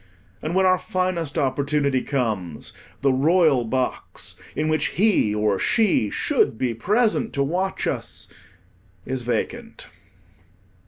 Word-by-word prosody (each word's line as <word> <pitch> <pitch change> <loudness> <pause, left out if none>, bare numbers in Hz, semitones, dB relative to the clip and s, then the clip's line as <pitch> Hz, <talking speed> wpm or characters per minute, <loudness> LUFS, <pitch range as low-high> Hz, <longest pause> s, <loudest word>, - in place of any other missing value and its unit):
And 160 +3 -3
when 190 0 +4
our 185 0 +4
finest 180 -5 -2
opportunity 140 -1 +1
comes, 110 - -3 0.3
the 135 -1 +3
royal 150 -1 +3
box, 125 +3 -3 0.2
in 155 - 0
which 155 0 +1
he 185 - +3
or 105 -2 +1
she 205 - +2
should 110 - +1
be 125 -1 0
present 220 - +1
to 140 - +1
watch 185 +7 -1
us, - - -4 0.8
is 130 0 -3
vacant. 120 0 -4
140 Hz, 120 wpm, -23 LUFS, 125-185 Hz, 0.8 s, when